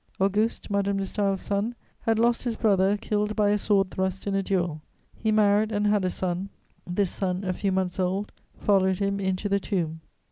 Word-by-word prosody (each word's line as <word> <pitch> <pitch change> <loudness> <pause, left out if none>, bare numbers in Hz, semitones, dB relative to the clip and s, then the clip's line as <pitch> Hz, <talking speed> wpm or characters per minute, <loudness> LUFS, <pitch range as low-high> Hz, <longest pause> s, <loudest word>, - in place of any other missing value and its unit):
Auguste, 205 +3 0
Madame 200 0 +1
de 195 - -1
Staël's 195 -1 -1
son, 205 +4 -1 0.2
had 225 -1 +1
lost 235 +1 +3
his 240 -2 -2
brother 200 -2 +3
killed 210 +1 -1
by 205 -1 +3
a 210 - +3
sword 195 -2 +2
thrust 190 0 -2
in 200 - -1
a 195 - +2
duel; 175 -5 -1 0.3
he 220 - -1
married 210 0 +3
and 205 -1 0
had 205 -1 +3
a 185 - +1
son: 185 +1 -2 0.4
this 180 +1 0
son, 185 0 -2
a 185 -1 -1
few 195 +2 -1
months 185 -1 -1
old, 190 +3 -1 0.3
followed 190 -2 +2
him 200 0 -1
into 190 +1 -1
the 200 0 +2
tomb. 165 -5 -2
200 Hz, 200 wpm, -26 LUFS, 190-210 Hz, 0.4 s, lost